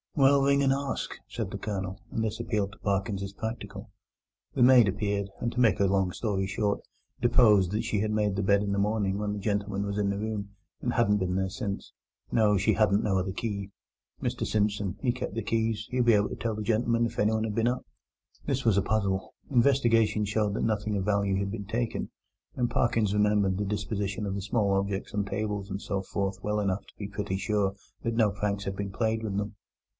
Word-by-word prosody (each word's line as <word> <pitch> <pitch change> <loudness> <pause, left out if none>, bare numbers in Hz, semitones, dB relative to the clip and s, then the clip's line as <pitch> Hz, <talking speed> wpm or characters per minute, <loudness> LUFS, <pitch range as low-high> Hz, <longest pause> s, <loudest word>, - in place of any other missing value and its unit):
"Well, 140 0 +5
ring 140 0 +3
and 135 -1 +4
ask," 140 0 -3 0.2
said - - -4
the - - -5
Colonel, 95 -2 -4
and 110 - -1
this 110 0 -2
appealed 105 -4 -1
to - - -16
Parkins 100 0 -1
as 100 0 -6
practical. 110 +3 -6 0.6
The - - +4
maid 125 -3 +7
appeared, 100 0 -1
and, 120 - -1
to 125 - -3
make 115 -3 +4
a 100 - +4
long 95 -1 +2
story 95 -2 -1
short, 100 +1 0 0.4
deposed 105 -6 +5
that 105 - 0
she 105 - 0
had 110 0 0
made 105 -2 +1
the 100 - -1
bed 100 +1 +4
in 100 -1 -1
the 100 - 0
morning 100 -1 +1
when 105 0 -1
the 105 - -3
gentleman 100 -1 -1
was 100 0 -3
in 100 -1 +1
the 100 - -1
room, 105 -2 -3 0.3
and - - -1
hadn't 105 +1 +3
been 90 -2 -1
there 95 0 0
since. 100 -1 -5 0.4
No, 105 -2 +4
she 95 - +3
hadn't 105 -1 +3
no 100 -3 +1
other 95 +1 -2
key. 100 -1 -3 0.5
Mr - - -1
Simpson 105 -2 0
he 125 - +2
kep' 125 +1 -4
the 115 - -3
keys; 110 0 0
he'd 125 -1 +1
be 120 - +6
able 105 -1 +3
to - - -5
tell 115 -2 -2
the 105 - -4
gentleman 115 +2 +2
if 115 0 -5
anyone 110 +1 +2
had 110 -2 -2
been 115 0 +2
up. 125 +1 -1 0.6
This 135 -2 -1
was 110 -4 +4
a - - +5
puzzle. 100 -3 0 0.2
Investigation 120 -5 +3
showed 105 0 0
that - - -1
nothing 105 -1 0
of 95 - -2
value 100 -2 +1
had 100 0 -1
been 100 -2 -5
taken, 115 +3 -2 0.5
and 120 -2 0
Parkins 115 -5 +2
remembered 105 -2 +2
the 105 - -1
disposition 105 0 -2
of 100 -1 -2
the 100 - -3
small 100 0 +1
objects 95 0 -1
on 100 -1 0
tables 100 -1 -3
and 100 +1 -4
so 100 -1 -2
forth 95 0 -3
well 105 0 0
enough 100 -1 -1
to - - -17
be 100 - -5
pretty 100 -2 -3
sure 100 -1 0 0.3
that 115 0 -1
no 110 -3 +4
pranks 100 0 -2
had 95 - -3
been 100 0 -4
played 110 +2 0
with 100 -3 -2
them. 105 0 -3
105 Hz, 220 wpm, -28 LUFS, 100-110 Hz, 0.6 s, maid